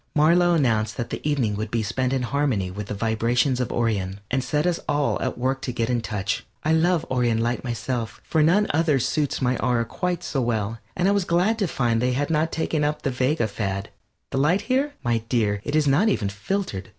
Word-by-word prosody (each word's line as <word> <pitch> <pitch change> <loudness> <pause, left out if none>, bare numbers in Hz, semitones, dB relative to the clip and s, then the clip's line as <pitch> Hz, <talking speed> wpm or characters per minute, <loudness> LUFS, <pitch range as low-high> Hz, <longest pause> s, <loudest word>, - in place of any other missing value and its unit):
Marlow 170 +3 +4
announced 115 -8 +1
that 120 -2 -4
the - - -4
evening 135 -8 0
would 110 +1 -3
be 115 -1 -1
spent 125 +4 -1
in 135 -2 0
harmony 125 -8 0
with 100 +2 -6
the 105 - -4
vibrations 115 +5 +1
of 125 - -1
Orion, 100 -5 -1
and 130 0 +1
set 150 +3 0
us 175 -1 +1
all 145 -1 +1
at 130 - -2
work 130 +2 -1
to 130 - -3
get 115 0 -1
in 120 -1 +1
touch. 105 0 -2 0.2
I 155 - +2
love 165 0 +2
Orion 120 -3 +2
light 120 +2 -1
myself, 120 -1 -3
for 160 - +1
none 180 +7 +4
other 155 -2 +3
suits 145 +2 -1
my 125 0 +2
aura 120 -2 +1
quite 180 +7 -3
so 135 - -1
well, 115 -2 -1 0.2
and 180 - +1
I - - +4
was 200 -1 +2
glad 180 +6 +1
to 200 - +1
find 120 -7 0
they 125 0 +1
had 145 +5 -1
not 160 +1 +1
taken 160 -1 -1
up 150 +1 -1
the 135 - 0
Vega 130 0 +1
fad. 100 -2 -3 0.4
The 135 - 0
light 170 +8 +3
here? 265 +6 0
My 120 -2 +1
dear, 105 -5 +1
it 145 - -2
is 155 -1 +3
not 175 +11 +4
even 105 - 0
filtered. 100 - -3
130 Hz, 225 wpm, -24 LUFS, 115-155 Hz, 0.4 s, Marlow